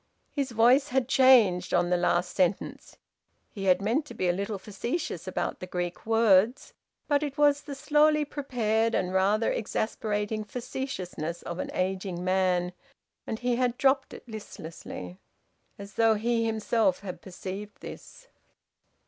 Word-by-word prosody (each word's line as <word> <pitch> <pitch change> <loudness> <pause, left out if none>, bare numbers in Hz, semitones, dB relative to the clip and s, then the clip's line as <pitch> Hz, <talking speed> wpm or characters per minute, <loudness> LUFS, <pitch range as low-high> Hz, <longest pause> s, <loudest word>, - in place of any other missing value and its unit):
His 280 -2 -2
voice 245 +5 +4
had 265 -3 0
changed 250 -9 +5
on 175 0 +2
the - - +4
last 175 0 +1
sentence. 185 0 -1 0.5
He 195 -2 -6
had 185 +1 +3
meant 235 +9 +1
to 240 - -10
be 185 - 0
a 175 - +3
little 200 +3 -3
facetious 200 - -4
about 185 - -2
the 185 - -7
Greek 175 +2 -4
words; 225 +2 +3 0.3
but 290 -1 +2
it 290 -1 -4
was 290 -1 +4
the 285 -1 -7
slowly 300 +1 +3
prepared 230 -6 0
and 185 0 -1
rather 200 +4 +2
exasperating 215 0 -2
facetiousness 200 - -5
of 170 +1 -5
an - - -3
ageing 185 -1 -2
man, 185 -1 +1 0.5
and 220 - -2
he 245 0 0
had 250 -1 0
dropped 270 0 +2
it - - -11
listlessly, 160 - -8 0.6
as 200 0 -10
though 225 -1 +4
he 230 +1 0
himself 220 -3 +1
had 190 -3 -7
perceived 195 +2 -7
this. - - -11
215 Hz, 150 wpm, -28 LUFS, 185-250 Hz, 0.6 s, changed